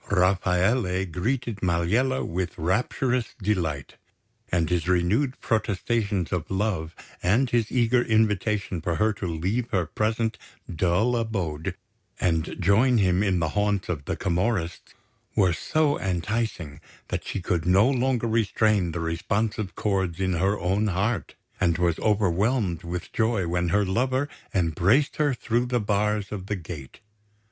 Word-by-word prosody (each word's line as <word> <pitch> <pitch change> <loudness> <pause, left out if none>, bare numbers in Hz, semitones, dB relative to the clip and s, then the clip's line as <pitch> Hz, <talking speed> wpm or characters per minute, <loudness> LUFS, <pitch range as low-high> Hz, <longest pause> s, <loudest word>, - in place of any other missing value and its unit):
Rafaele 95 +1 +2
greeted 110 - -2
Maliella 95 +9 +1
with 90 +1 -3
rapturous 120 +7 0
delight; 85 - -2 0.5
and 85 -2 +2
his 85 -1 0
renewed 95 +10 +1
protestations 105 -3 0
of 90 -3 -2
love 95 -5 -1 0.3
and 115 +9 +3
his 115 -2 +1
eager 120 0 +3
invitation 105 -5 +1
for 85 +1 -1
her 110 +5 +2
to 95 -2 -5
leave 95 +9 -1
her 95 -6 +1
present 110 +5 -1 0.4
dull 95 +9 +2
abode 95 -10 -2 0.4
and 80 -3 0
join 110 +7 +4
him 95 -2 +3
in 95 -3 +2
the 80 -2 0
haunts 105 +2 0
of 75 -6 -3
the - - -2
Camorrists 90 -1 -2 0.4
were 95 -4 +4
so 150 - +1
enticing 90 -4 -2 0.3
that - - -2
she - - -4
could 85 -2 -1
no 95 +5 +5
longer 130 -2 +1
restrain 110 -5 +2
the 85 - -3
responsive 100 +5 -2
chords 95 -5 -1
in 95 -1 +1
her 95 +5 +1
own 95 +4 +1
heart, 100 +1 -1 0.2
and 85 -3 +2
was 85 -2 +1
overwhelmed 100 -2 +1
with 85 +1 -6
joy 110 -5 +1
when 90 0 0
her 100 +3 +2
lover 130 +8 0 0.2
embraced 95 - +2
her 145 -3 +2
through 120 +1 0
the 120 0 +1
bars 105 -1 0
of 95 -3 -5
the 105 - -1
gate. 80 -7 -9
100 Hz, 140 wpm, -25 LUFS, 90-110 Hz, 0.5 s, no